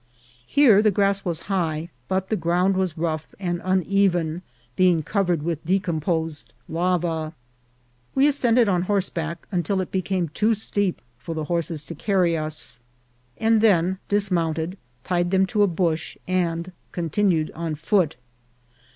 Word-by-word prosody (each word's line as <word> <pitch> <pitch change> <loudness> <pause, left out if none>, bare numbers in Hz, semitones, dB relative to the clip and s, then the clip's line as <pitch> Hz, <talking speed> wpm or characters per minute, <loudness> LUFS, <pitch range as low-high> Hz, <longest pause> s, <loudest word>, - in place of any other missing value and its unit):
Here 235 -8 +6
the 215 - +4
grass 200 0 +1
was 170 -3 -3
high, 170 -4 -2 0.2
but 190 0 -1
the 220 - +1
ground 180 +2 +1
was 185 -4 -1
rough 160 -1 -3
and 175 -2 -2
uneven, 185 -3 +1 0.3
being 180 -4 +3
covered 175 -4 0
with 165 -1 -2
decomposed 165 -3 -1
lava. 165 -2 -1 0.8
We 275 +2 +5
as 290 - +2
cended 240 -4 +3
on 180 -3 +2
horseback 170 -4 -2
until 185 +1 0
it 185 - -3
became 185 -2 -1
too 215 +8 +1
steep 200 -3 -1 0.2
for 165 +6 -6
the 155 - -2
horses 165 -1 -2
to - - -7
carry 180 0 +1
us, 155 -6 -3 0.6
and 225 -1 +3
then 190 -3 +3
dismounted, 175 -4 +1 0.3
tied 175 +1 0
them 190 +1 +3
to 210 +2 0
a 205 - +6
bush, 165 -3 -1
and 175 -1 -1 0.2
continued 170 -1 0
on 165 -1 -3
foot. 175 -1 +1
180 Hz, 140 wpm, -24 LUFS, 165-195 Hz, 0.8 s, Here